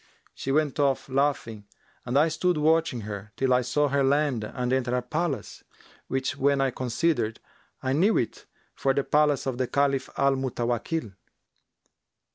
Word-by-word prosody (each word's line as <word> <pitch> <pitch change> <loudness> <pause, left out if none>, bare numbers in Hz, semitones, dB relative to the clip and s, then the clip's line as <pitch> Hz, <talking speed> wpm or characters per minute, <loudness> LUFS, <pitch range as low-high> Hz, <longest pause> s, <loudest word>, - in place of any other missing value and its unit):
She 135 - -4
went 150 0 +1
off 140 -2 +1
laughing, 130 -6 -1 0.4
and 125 +3 +1
I 150 +3 +5
stood 180 +2 0
watching 155 -5 +2
her, 105 0 -7
till 130 -1 +2
I 125 - +4
saw 145 +4 +1
her 140 0 +2
land 140 -4 +2
and 125 +3 -2
enter 125 -1 0
a 125 - +1
palace, 150 - -3 0.4
which 135 +2 -1
when 140 0 +2
I 135 -1 +2
considered, 125 -2 -1 0.4
I 130 0 0
knew 195 +9 +3
it 115 - -3 0.3
for 135 -1 0
the 140 - +1
palace 150 -2 +2
of 130 -2 -3
the 130 - +1
Caliph 140 -1 +1
Al 140 0 +3
Mutawakkil. 120 - -2
135 Hz, 160 wpm, -26 LUFS, 125-145 Hz, 0.4 s, I